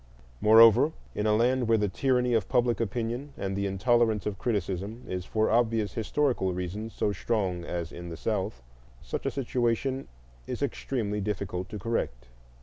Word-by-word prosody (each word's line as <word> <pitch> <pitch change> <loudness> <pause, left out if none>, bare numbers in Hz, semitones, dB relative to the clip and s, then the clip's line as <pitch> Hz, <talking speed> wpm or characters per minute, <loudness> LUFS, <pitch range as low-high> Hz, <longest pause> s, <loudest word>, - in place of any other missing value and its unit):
Moreover, 115 +7 +7 0.2
in 105 - -1
a 105 - +4
land 125 +2 +2
where 115 0 +4
the 105 -1 +1
tyranny 125 +3 +1
of 110 -4 +1
public 120 -1 +2
opinion 120 +5 -3
and 95 0 -3
the 100 0 0
intolerance 110 +2 +2
of 100 -2 -3
criticism 105 +1 -2
is 90 -1 -4
for 110 +1 +1
obvious 115 -4 +2
historical 115 -4 0
reasons 95 +5 -4
so 105 - +1
strong 95 -4 -1
as 85 0 -4
in 85 0 -8
the 80 - -7
South, 95 - -2 0.4
such - - -4
a - - +3
situation 130 0 -1 0.4
is - - -3
extremely 105 -6 -2
difficult 95 -2 -3
to 110 - -5
correct. 80 - -3
110 Hz, 160 wpm, -28 LUFS, 95-120 Hz, 0.4 s, Moreover